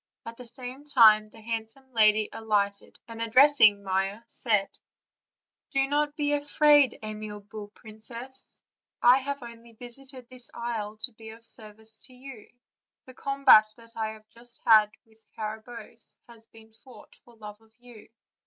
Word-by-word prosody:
At 230 Hz, -, -8 dB
the 250 Hz, -, -9 dB
same 255 Hz, +3 st, -5 dB
time 220 Hz, -7 st, +5 dB
the 225 Hz, -, -15 dB
hand 225 Hz, 0 st, -4 dB
some 265 Hz, +2 st, -6 dB
lady 215 Hz, -1 st, +4 dB
alighted, 205 Hz, -2 st, -2 dB
and 230 Hz, -1 st, -9 dB
addressing 230 Hz, -3 st, +5 dB
Maia, 195 Hz, +2 st, -2 dB
said: 215 Hz, -4 st, -1 dB, 0.9 s
"Do 270 Hz, -1 st, 0 dB
not 295 Hz, +1 st, 0 dB
be 290 Hz, -1 st, 0 dB
afraid, 290 Hz, -2 st, +3 dB
amiable 210 Hz, -1 st, -8 dB
princess; 230 Hz, +4 st, -5 dB, 0.4 s
I 245 Hz, +2 st, +7 dB
have 280 Hz, 0 st, -5 dB
only 235 Hz, 0 st, -12 dB
vis 240 Hz, +3 st, -5 dB
ited 265 Hz, -2 st, -13 dB
this 255 Hz, -1 st, -10 dB
isle 220 Hz, -3 st, -4 dB
to 250 Hz, -, +5 dB
be 220 Hz, 0 st, -13 dB
of 225 Hz, +1 st, -14 dB
service 220 Hz, 0 st, -4 dB
to 255 Hz, -, -17 dB
you; 250 Hz, -4 st, -12 dB, 0.6 s
the 255 Hz, -, -13 dB
combat 270 Hz, -6 st, +5 dB
that 230 Hz, 0 st, -18 dB
I 220 Hz, -1 st, -2 dB
have 215 Hz, 0 st, -16 dB, 0.4 s
had 215 Hz, -2 st, +6 dB, 0.2 s
with 220 Hz, 0 st, -26 dB
Carabosse 220 Hz, +2 st, -7 dB
has 230 Hz, -2 st, -17 dB
been 220 Hz, 0 st, -19 dB
fought 245 Hz, +3 st, -17 dB
for 240 Hz, -, -21 dB
love 210 Hz, -1 st, -11 dB
of 220 Hz, 0 st, -26 dB
you. 240 Hz, -3 st, -16 dB
230 Hz, 155 wpm, -27 LUFS, 215-255 Hz, 0.9 s, I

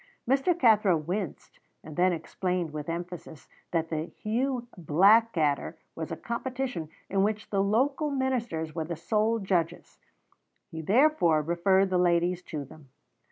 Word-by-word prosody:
Mr. 275 Hz, +7 st, +2 dB
Cathro 215 Hz, -, +4 dB
winced, 175 Hz, +3 st, -5 dB, 0.2 s
and 155 Hz, -, -10 dB
then 180 Hz, +2 st, +3 dB
explained 175 Hz, 0 st, -2 dB
with 150 Hz, +1 st, -5 dB
emphasis 170 Hz, -2 st, -7 dB, 0.2 s
that 165 Hz, -1 st, -1 dB
the 155 Hz, 0 st, -1 dB
Hugh 245 Hz, +5 st, -2 dB
Blackadder 175 Hz, -2 st, +3 dB, 0.2 s
was 160 Hz, +1 st, -5 dB
a 165 Hz, -, -4 dB
competition 245 Hz, -, -4 dB, 0.2 s
in 195 Hz, 0 st, +1 dB
which 215 Hz, +2 st, -1 dB
the 200 Hz, -1 st, +2 dB
local 270 Hz, +9 st, +1 dB
ministers 240 Hz, -, -2 dB
were 160 Hz, -1 st, -2 dB
the 170 Hz, +1 st, -4 dB
sole 215 Hz, +7 st, +1 dB
judges; 185 Hz, -5 st, -2 dB, 0.7 s
he 160 Hz, -, -5 dB
therefore 195 Hz, -, +3 dB
referred 190 Hz, +4 st, +2 dB
the 180 Hz, -, +2 dB
ladies 175 Hz, 0 st, +2 dB
to 150 Hz, -5 st, -6 dB
them. 145 Hz, -1 st, -16 dB
180 Hz, 140 wpm, -28 LUFS, 165-230 Hz, 0.7 s, Cathro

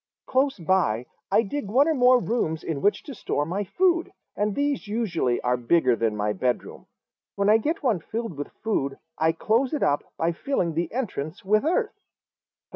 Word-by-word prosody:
Close 270 Hz, +1 st, +1 dB
by 165 Hz, -, +1 dB, 0.3 s
I 230 Hz, -, +4 dB
dig 235 Hz, +3 st, -4 dB
one 260 Hz, +9 st, +4 dB
or 320 Hz, -, +3 dB
more 255 Hz, -2 st, +5 dB
rooms 220 Hz, -10 st, -1 dB
in 150 Hz, -4 st, -3 dB
which 205 Hz, -, +2 dB
to 280 Hz, -, -8 dB
store 145 Hz, -, -2 dB
my 190 Hz, +6 st, -2 dB
food, 350 Hz, -, +1 dB, 0.2 s
and 205 Hz, 0 st, -1 dB
these 285 Hz, -5 st, -1 dB
usually 195 Hz, -, 0 dB
are 125 Hz, 0 st, +1 dB
bigger 125 Hz, +1 st, +3 dB
than 115 Hz, -2 st, -1 dB
my 105 Hz, 0 st, 0 dB
bedroom. 120 Hz, +5 st, -3 dB, 0.5 s
When 200 Hz, 0 st, +1 dB
I 220 Hz, -, +6 dB
get 305 Hz, +7 st, -2 dB
one 230 Hz, -9 st, +2 dB
filled 225 Hz, +2 st, -5 dB
with 145 Hz, +1 st, -5 dB, 0.2 s
food 140 Hz, -11 st, -1 dB, 0.2 s
I 160 Hz, +1 st, +4 dB
close 230 Hz, -, +1 dB
it 295 Hz, -, -1 dB
up 145 Hz, -, +2 dB
by 165 Hz, +1 st, +1 dB
filling 170 Hz, -, -1 dB
the 170 Hz, +2 st, -2 dB
entrance 190 Hz, -, -4 dB
with 215 Hz, +2 st, +3 dB
earth." 410 Hz, +7 st, 0 dB
200 Hz, 185 wpm, -25 LUFS, 155-255 Hz, 0.5 s, I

